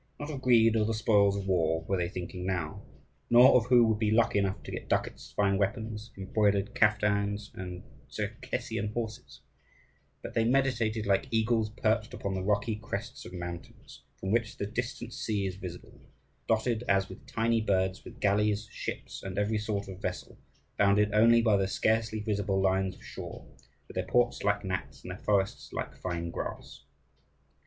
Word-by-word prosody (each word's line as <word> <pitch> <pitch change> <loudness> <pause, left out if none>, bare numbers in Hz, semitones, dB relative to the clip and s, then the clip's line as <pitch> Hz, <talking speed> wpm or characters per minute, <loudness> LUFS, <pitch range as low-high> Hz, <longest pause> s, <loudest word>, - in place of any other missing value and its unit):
Not 145 +1 -5
of 135 -3 -5
greed 115 -3 +5
or 110 - +3
the 110 +1 0
spoils 100 -2 +3
of 100 - -4
war 80 -4 +1
were 95 - -1
they 90 -2 -1
thinking 90 0 -6
now, 90 -5 -2 0.5
nor 120 +2 +8
of 120 -2 +4
who 125 -2 +6
would 110 -1 +1
be 110 -1 +2
lucky 110 -1 +3
enough 100 0 -1
to - - -8
get - - -6
ducats, - - -1
fine 100 -1 +3
weapons, 110 +2 -2
embroidered 100 +1 +1
caftans, 105 -1 +1
and 90 -1 -7 0.3
Tcherkessian 105 +1 -3
horses; 115 +1 -5 0.8
but - - -6
they 115 - +2
meditated 115 -3 +1
like 100 -1 +2
eagles 110 -1 +1
perched 110 0 0
upon 100 - -3
the 95 - -2
rocky 105 +2 0
crests 120 +6 -6
of - - -11
mountains, 85 -1 -8
from 95 - -4
which 115 -1 0
the - - -2
distant 120 +2 -4
sea 105 -3 -1
is 95 -1 -3
visible, 90 -2 -9 0.5
dotted, 115 +1 +1
as 95 0 +3
with 95 - -12
tiny 115 0 +1
birds, 95 -2 0
with - - -12
galleys, 105 +1 +2
ships, - - -6
and 95 0 -6
every 105 +1 +1
sort 105 -2 -2
of 95 0 -9
vessel, - - -4 0.4
bounded 100 +1 +3
only 115 +2 +6
by 110 -3 +4
the 95 -1 +1
scarcely 110 +2 +1
visible 100 -2 0
lines 95 0 +1
of - - -18
shore, - - -8 0.4
with - - -11
their - - -2
ports 120 0 +2
like 100 0 +1
gnats 95 -1 -4
and - - -6
their - - -7
forests 100 -2 0
like - - -4
fine 85 -2 -4
grass. - - -6
105 Hz, 175 wpm, -30 LUFS, 95-115 Hz, 0.8 s, nor